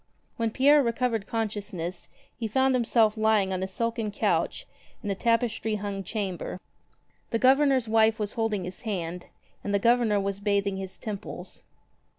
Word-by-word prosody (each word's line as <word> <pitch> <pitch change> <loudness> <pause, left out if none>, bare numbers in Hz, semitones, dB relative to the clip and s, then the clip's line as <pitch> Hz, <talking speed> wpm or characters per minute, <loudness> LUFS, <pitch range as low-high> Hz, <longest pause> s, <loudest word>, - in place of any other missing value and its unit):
When 230 -1 0
Pierre 285 +5 +5
recovered 230 -3 0
consciousness 200 -6 -3 0.3
he 230 - -3
found 265 +4 +2
himself 230 -3 +3
lying 215 -3 +2
on 185 - -2
a 190 - -1
silken 230 +2 -2
couch 205 - 0 0.4
in 205 - -2
a - - +2
tapestry 225 0 0
hung 200 -1 -4
chamber. 190 -2 -4 0.7
The 230 - +1
Governor's 265 0 +4
wife 220 0 +4
was 210 -1 -3
holding 225 -4 -1
his 180 +1 -7
hand, 180 -5 -4 0.4
and 205 - -1
the - - +5
Governor 230 -1 +3
was 200 0 -2
bathing 200 -1 0
his 190 -1 -6
temples. 210 -3 -7
215 Hz, 155 wpm, -27 LUFS, 195-230 Hz, 0.7 s, Pierre